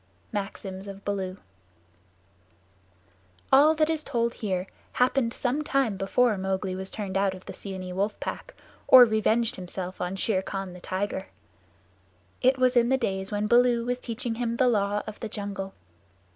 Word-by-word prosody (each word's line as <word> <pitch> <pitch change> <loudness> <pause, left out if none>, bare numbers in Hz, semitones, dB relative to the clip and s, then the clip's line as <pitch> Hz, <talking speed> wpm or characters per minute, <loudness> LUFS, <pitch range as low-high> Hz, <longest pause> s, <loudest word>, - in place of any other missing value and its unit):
Maxims 195 -2 -5
of 200 0 -9
Baloo 190 -2 -2 2.2
All 300 +4 +7
that 310 0 +3
is 315 -1 -1
told 235 -4 0
here 185 -4 -2 0.3
happened 250 -1 +2
some 265 +5 -1
time 270 -8 +1
before 205 +3 +2
Mowgli 190 0 -1
was 190 +1 -5
turned 200 -3 -5
out 195 -1 +1
of 185 - -13
the - - -7
Seeonee 185 -2 -6
Wolf 200 +3 -1
Pack, - - -6 0.3
or 255 -1 +10
revenged 220 +1 +1
himself 185 0 -5
on 180 +1 -2
Shere 195 0 0
Khan 195 -1 -5
the 180 - -11
tiger. 190 +1 -3 1.1
It 260 +1 +4
was 255 0 +3
in 240 0 +4
the 265 - +3
days 190 -5 -2
when 205 0 0
Baloo 240 +1 +4
was 245 0 -1
teaching 235 0 -3
him 235 0 -2
the 255 - +4
Law 205 -3 +1
of 215 - -8
the 225 - -5
Jungle. 200 -2 -5
210 Hz, 160 wpm, -27 LUFS, 190-245 Hz, 2.2 s, or